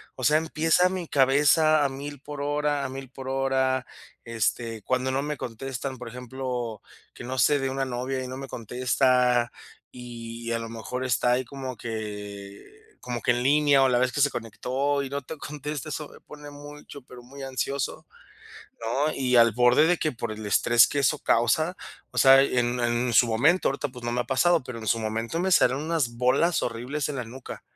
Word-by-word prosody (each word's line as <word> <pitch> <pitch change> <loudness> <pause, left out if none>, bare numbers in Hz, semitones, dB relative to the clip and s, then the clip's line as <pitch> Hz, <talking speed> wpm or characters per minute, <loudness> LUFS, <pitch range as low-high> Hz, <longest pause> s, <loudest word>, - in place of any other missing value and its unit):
o 130 - -8
sea, 150 +4 +5
empieza 160 +3 +2
mi 185 -2 -4
cabeza 145 +3 +4
a - - +1
1000 140 +1 -7
por 145 +1 -8
hora, 145 0 0
a 135 - -3
1000 135 0 -8
por 130 +1 -8
hora, 130 -1 0 0.4
este, 115 0 -2
cuando 130 +2 -1
no 135 +1 0
me 150 +1 -3
contestan, 130 +2 -5
por 125 -1 -8
ejemplo, 125 -2 -5 0.3
que - - -10
no 130 +2 -5
sé 145 +4 +4
de 135 0 -1
una 135 0 -2
novia 130 +1 -3
y - - -6
no 130 - -6
me 135 0 -7
contesta, 125 0 +1 0.4
y 115 -1 -7
a 115 - 0
lo 115 0 -6
mejor 115 +3 -5
está 125 -1 +1
ahí 130 +1 0
como 130 -1 -7
que 105 - -8
como 120 -2 -5
que 125 - +2
en 120 0 0
línea 145 0 +4
o 135 - +4
la 120 -1 +2
vez 130 0 +1
que 145 - -4
se 145 0 +4
conectó 130 +5 -2
y 135 - -5
no 140 +1 -3
te 155 +4 -8
contesta, 150 0 -6
eso 150 -1 -5
me - - -15
pone 150 -1 -12
mucho, 145 -1 -11
pero 125 0 -13
muy 135 +3 -12
ansioso, 135 +1 -3 0.8
¿no? 135 +7 0
Y 125 -2 +1
al 115 -1 +6
borde 125 +6 +4
de 175 +1 +3
que, 155 - -1
por 115 -2 -5
el 110 0 -8
estrés 115 +3 +5
que 145 - -3
eso 140 -3 +2
causa, 155 +9 +2 0.4
o - - -5
sea, 135 0 +8
en 125 -2 0
en 120 +1 0
su 120 - +6
momento, 145 +11 +3
ahorita, 145 - -2
pues, 125 -2 -11
no 120 - -2
me 120 - 0
ha - - -2
pasado, 165 +7 +2
pero 125 -2 -7
en 110 - -8
su 115 - +2
momento 115 +7 -3
me 190 +1 0
salieron 140 -3 +3
unas 155 -8 -1
bolas 135 +8 +2
horribles 125 +5 -3
en 145 - -4
la 125 - -3
nuca. 125 +4 -9
130 Hz, 205 wpm, -26 LUFS, 120-145 Hz, 0.8 s, sea